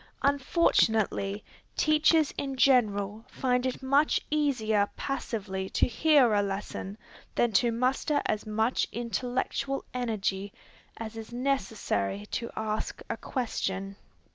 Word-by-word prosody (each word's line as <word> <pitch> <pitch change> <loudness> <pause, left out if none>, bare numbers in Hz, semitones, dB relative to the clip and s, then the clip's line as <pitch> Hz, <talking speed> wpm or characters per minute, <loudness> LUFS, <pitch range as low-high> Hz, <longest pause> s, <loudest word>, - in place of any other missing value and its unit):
Unfortunately, 225 - +2 0.3
teachers 310 0 +4
in 275 -1 -3
general 215 -5 +2
find 250 -1 0
it 255 +1 -4
much 280 +3 +3
easier 220 -9 +2
passively 195 -8 -3
to - - +2
hear 270 -2 +4
a 205 - +4
lesson, 200 0 -4 0.4
than 240 - +2
to 235 +3 +3
muster 255 +5 +1
as 215 - 0
much 220 +3 0
intellectual 250 +4 -2
energy 205 -5 -2 0.5
as 225 0 -6
is 225 +1 -8
necessary 220 - -1
to 235 - -2
ask 215 0 -3
a - - -1
question. 195 -6 -3
230 Hz, 115 wpm, -29 LUFS, 205-265 Hz, 0.5 s, teachers